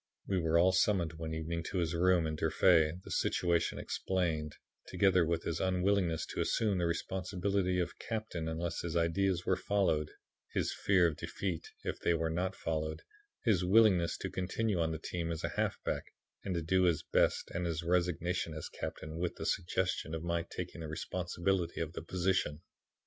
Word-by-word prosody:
We 95 -2 +1
were 80 -1 +2
all 90 +2 +5
summoned 95 -3 +2
one 80 0 -4
evening 85 +1 -3
to 95 - -3
his 85 -2 0
room 90 0 +3
in 80 0 -2
Durfee; 80 0 +4
the - - -10
situation 85 -2 +1
explained, 80 -5 -1 0.3
together 95 -3 +3
with 85 0 0
his 80 - -2
unwillingness 90 -3 +1
to - - -1
assume 105 -5 +1
the 85 - +1
responsibility 90 +2 -1
of 85 -1 -3
captain 110 -8 -4
unless 80 +1 -2
his 85 0 -2
ideas 90 +2 +1
were - - +3
followed; 85 -7 +1 0.4
his - - 0
fear 95 -3 +3
of 80 -3 +1
defeat, 85 +1 -4 0.2
if - - -3
they 85 - +2
were 80 0 0
not 90 +3 -1
followed, 80 -1 -3 0.4
his 100 -7 +3
willingness 95 -3 +4
to - - -4
continue 95 +2 -1
on 80 -1 +1
the 80 - -2
team 85 +1 -3
as 80 - -4
a - - 0
halfback - - -2 0.4
and 95 -2 -2
to 85 - -1
do 95 +3 +3
his 80 -3 +2
best - - +1
and 85 +1 -2
his 80 -1 -2
resignation 85 -1 0
as 80 - -5
captain 80 +1 -6
with 90 0 -1
the - - -6
suggestion 90 -2 -1
of 80 - -5
my 85 0 0
taking 85 0 -6
the 80 - -5
responsibility 85 +2 -1
of 80 -2 -3
the - - -5
position. 90 -3 0
85 Hz, 180 wpm, -33 LUFS, 80-95 Hz, 0.4 s, all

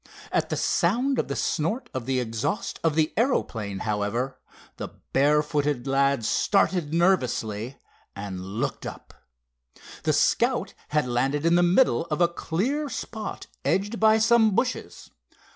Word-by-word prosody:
At - - 0
the - - -1
sound 245 +10 +1
of - - 0
the 140 - -3
snort 170 - -1
of 130 -2 -4
the 130 -1 +1
exhaust 115 -3 -3
of 160 -2 +2
the 155 -1 +1
aeroplane, 115 - -1
however, 110 +5 -2 0.4
the - - -4 0.3
barefooted 145 -1 +2
lad 135 -3 +2
started 180 - +1
nervously, 130 - 0 0.4
and 100 -2 -6
looked 100 +5 -3
up. - - -10 0.9
The - - +1
Scout - - +2
had 150 -1 +1
landed 135 +5 0
in 170 - +4
the 175 - +5
middle 175 +2 +3
of 150 -1 -2
a 175 - +5
clear 235 - -2
spot 220 -5 -6 0.2
edged 205 +4 0
by 220 0 +5
some 220 -2 +4
bushes. 250 +2 -2
150 Hz, 140 wpm, -25 LUFS, 125-200 Hz, 0.9 s, the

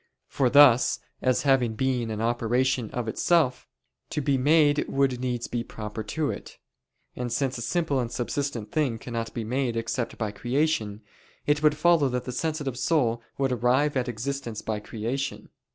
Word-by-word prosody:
For 130 -3 +1
thus, 130 -3 +6 0.2
as 130 -1 +2
having 130 -5 +2
being 125 -1 0
and 110 0 -3
operation 120 +1 +1
of 120 -2 -4
itself, 145 +2 +1 0.4
to - - -2
be 140 -1 +1
made 145 +2 +3
would 135 -2 +1
needs 125 -2 -2
be 120 -1 -3
proper 105 -1 -6
to 145 +8 -2
it. - - -9 0.6
And 125 -1 -4
since 130 0 -1
a - - -6
simple 160 +1 0
and 120 -2 -2
subsistent 120 -3 -3
thing 140 -7 0
cannot 115 0 -5
be 115 - -2
made 120 +1 -1
except 115 +1 -3
by 110 -3 -2
creation, 120 -3 -1 0.4
it 145 0 +2
would 150 -1 +3
follow 160 -3 +4
that 125 0 -2
the 125 - -4
sensitive 145 -2 -2
soul 120 -7 +1 0.2
would 135 -1 +1
arrive 125 +5 +2
at 125 -1 0
existence 120 -1 -4
by 110 -1 -2
creation. 120 +6 -4
125 Hz, 170 wpm, -26 LUFS, 115-140 Hz, 0.6 s, thus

